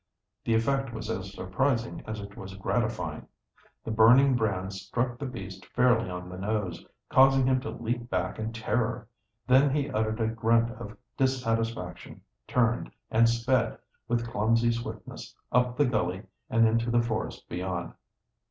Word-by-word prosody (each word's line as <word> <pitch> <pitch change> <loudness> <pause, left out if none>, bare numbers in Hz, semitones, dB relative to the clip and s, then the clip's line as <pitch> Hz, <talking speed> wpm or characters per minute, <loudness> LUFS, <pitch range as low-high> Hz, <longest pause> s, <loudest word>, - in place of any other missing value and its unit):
The 115 - +2
effect 135 +3 +1
was 110 -1 -4
as 95 -3 -4
surprising 115 +6 -1
as 110 -1 -4
it 100 0 -9
was 95 0 -8
gratifying. 95 - -2 0.6
The - - -4
burning 125 +5 +6
brands 95 -4 -1
struck 120 0 -2
the 140 - -3
beast 95 -6 -8
fairly 120 -4 +3
on 90 0 -6
the 90 0 -8
nose, 100 -4 -2 0.3
causing 135 0 +6
him 130 0 +2
to 140 - -5
leap 120 +1 -3
back 95 +1 -2
in 110 +1 -2
terror. 115 0 -1 0.4
Then 130 +3 +5
he 140 0 -1
uttered 110 -1 0
a 110 - +1
grunt 115 +1 +2
of 115 -3 -9 0.2
dissatisfaction, 115 -8 -1 0.3
turned, 120 -1 +1 0.2
and 115 +1 +5
sped, 120 +2 +1 0.3
with 120 0 0
clumsy 115 0 +2
swiftness, 115 0 -6 0.2
up 125 0 +2
the 145 - +4
gully 105 -6 -1 0.3
and 115 0 +4
into 115 +1 +1
the 120 0 +3
forest 115 -2 -3
beyond. 90 -1 -4
115 Hz, 150 wpm, -28 LUFS, 105-125 Hz, 0.6 s, burning